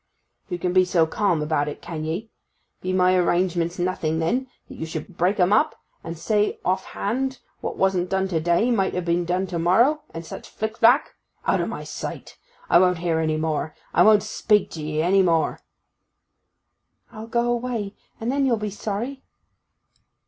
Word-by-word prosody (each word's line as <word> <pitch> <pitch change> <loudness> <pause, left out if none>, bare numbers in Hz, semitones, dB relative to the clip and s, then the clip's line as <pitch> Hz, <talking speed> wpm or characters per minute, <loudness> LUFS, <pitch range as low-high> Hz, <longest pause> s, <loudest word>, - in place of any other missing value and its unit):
'You 175 - -2
can 180 +1 -1
be 185 0 +6
so 175 -2 +3
calm 175 -3 0
about 150 -1 0
it, 150 - -5
can 160 -2 -6
ye? 185 +8 -4 0.5
Be 185 - -2
my 185 0 +3
arrangements 175 -1 +1
nothing, 175 -3 -1
then, 240 +12 0 0.2
that - - -10
you 160 - -4
should 160 +3 -6
break 185 +5 +1
'em 180 +2 +4
up, 300 +9 +3 0.3
and 165 0 -6
say 210 +5 0
off 185 +1 +1
hand 260 +5 -2 0.2
what - - -5
wasn't 185 -2 +1
done 190 +1 +1
to 165 -3 0
day 175 +9 +2
might 195 -5 +1
ha' 175 - -5
been 170 0 +1
done 180 +2 0
to 175 -2 -4
morrow, 235 - +3
and 165 0 -7
such - - -9
flick 220 +1 -4
flack? 245 +6 +5 0.3
Out - - +2
o' - - -1
my - - -5
sight! - - -7 0.3
I 170 - +6
won't 180 -1 +3
hear 165 -1 0
any 155 -1 0
more. 155 -1 -2 0.2
I - - +4
won't 215 -1 +6
speak 215 -1 +1
to 160 - -6
'ee 155 +1 -1
any 190 +3 +4
more.' 165 -3 +1 1.5
'I'll 220 -1 -8
go 235 +1 +1
away, 235 -4 -2 0.3
and 230 +2 -1
then 275 0 +1
you'll 235 -3 +2
be 210 -1 -3
sorry! 220 +7 -4
185 Hz, 185 wpm, -23 LUFS, 170-220 Hz, 1.5 s, be